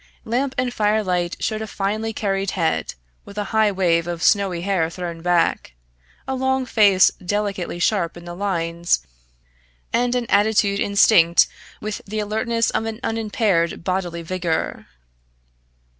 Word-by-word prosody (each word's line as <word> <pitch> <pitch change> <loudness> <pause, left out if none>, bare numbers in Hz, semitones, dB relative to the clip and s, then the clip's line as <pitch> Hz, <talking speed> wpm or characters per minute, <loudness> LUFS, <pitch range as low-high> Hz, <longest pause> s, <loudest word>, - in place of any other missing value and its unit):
Lamp 260 +4 -1
and 250 -1 0
fire 215 0 +1
light 180 -2 -1
showed 215 -1 -2
a 220 - -4
finely 215 +2 -2
carried 195 -2 -1
head, 160 - 0 0.3
with 200 - -13
a 210 - 0
high 220 -1 +4
wave 170 -3 +1
of 170 -1 -4
snowy 195 -5 +2
hair 180 -4 0
thrown 170 -1 -6
back, 175 - +1 0.5
a 265 - -1
long 265 0 0
face 200 -6 +5
delicately 200 -2 -2
sharp 175 -2 0
in 175 - -11
the 175 - -7
lines, 170 - -1 0.9
and 245 +1 +1
an 245 -1 0
attitude 200 -1 +2
instinct 190 -4 +5 0.4
with 215 0 -4
the 215 +2 -3
alertness 225 +2 0
of 225 - -1
an 225 0 -5
unimpaired 210 -7 0
bodily 175 -2 -2
vigour. 170 -1 -2
200 Hz, 145 wpm, -21 LUFS, 175-220 Hz, 0.9 s, face